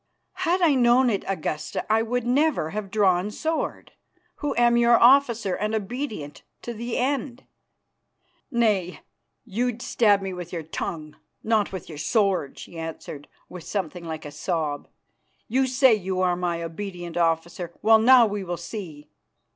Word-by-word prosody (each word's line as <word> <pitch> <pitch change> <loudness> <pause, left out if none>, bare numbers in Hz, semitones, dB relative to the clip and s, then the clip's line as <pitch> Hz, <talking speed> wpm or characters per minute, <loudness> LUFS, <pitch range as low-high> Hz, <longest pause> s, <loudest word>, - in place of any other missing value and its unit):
"Had 360 +2 +2
I 320 -4 +5
known 245 0 +4
it, 200 - -1
Augusta, 155 -5 -3
I 220 +1 +3
would 245 +1 -2
never 260 - +1
have 210 -1 -5
drawn 190 -2 +2
sword, 320 +9 -3 0.5
who 295 - -2
am 240 0 +4
your 235 0 +5
officer 235 -6 +4
and 215 +3 -1
obedient 210 - -5 0.2
to 240 - -5
the 235 +1 -4
end." 265 -1 -2 1.1
"Nay, 210 - 0 0.4
you'd 240 +2 -2
stab 205 -4 +3
me 190 -1 -4
with 180 -1 -7
your 170 -2 -4
tongue, 155 0 -6 0.3
not 220 -2 +1
with 190 -3 -7
your 155 -3 -9
sword," 190 - 0
she 170 - -9
answered 160 -3 -7 0.2
with 180 -2 -10
something 180 -2 -4
like 160 -1 -6
a 145 - -7
sob. 150 -1 -3 0.6
"You 260 +3 +1
say 260 -1 +5
you 190 -3 -2
are 180 -1 +2
my 175 -1 -2
obedient 175 0 -6
officer. 170 +1 -1
Well, 220 +1 +6
now 245 +1 +7
we 205 -2 -3
will 175 -1 -4
see. 170 -6 -8
205 Hz, 155 wpm, -24 LUFS, 170-240 Hz, 1.1 s, now